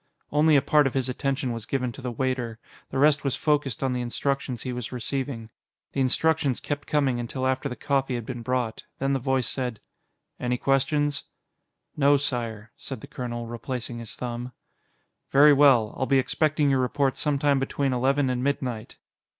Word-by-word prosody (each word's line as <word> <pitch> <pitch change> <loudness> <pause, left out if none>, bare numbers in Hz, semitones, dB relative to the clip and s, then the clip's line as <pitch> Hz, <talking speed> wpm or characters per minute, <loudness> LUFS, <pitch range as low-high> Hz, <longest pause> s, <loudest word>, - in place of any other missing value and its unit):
Only 150 +1 +4
a 140 - +4
part 150 -2 +4
of 135 - -4
his 130 -1 0
attention 135 0 -1
was 115 -2 -6
given 125 -3 -1
to 135 - -11
the 125 -1 -3
waiter; 125 -2 -2 0.3
the - - -4
rest 150 +1 +4
was 135 -3 0
focused 145 -5 0
on 130 -1 +1
the 125 - -1
instructions 130 0 -2
he 125 - -3
was 125 -2 -5
receiving. 125 -2 -4 0.4
The 135 - -1
instructions 145 0 +2
kept 145 -1 -4
coming 140 -5 +1
until 130 +2 -3
after 130 +2 0
the 125 - -5
coffee 135 -2 0
had 120 -2 -4
been 125 -1 -5
brought. 125 -2 -2
Then 135 +1 0
the 135 - +1
voice 130 -1 0
said: 125 -5 -2 0.6
"Any 125 0 0
questions?" 140 +2 +1 0.7
"No, 145 0 +5
Sire," 115 -6 -3
said 135 - -7
the - - -8
colonel, 120 -1 -5
replacing 120 +1 -5
his 115 -2 -7
thumb. 120 0 -5 0.8
"Very 145 +2 +7
well. 135 -7 +5
I'll 130 - -1
be 135 - +4
expecting 150 +2 +2
your 135 - +3
report 130 +1 +1
sometime 145 -1 +1
between 135 0 -1
eleven 135 +2 +2
and 125 0 -2
midnight." 130 -5 -2
130 Hz, 180 wpm, -26 LUFS, 125-140 Hz, 0.8 s, Very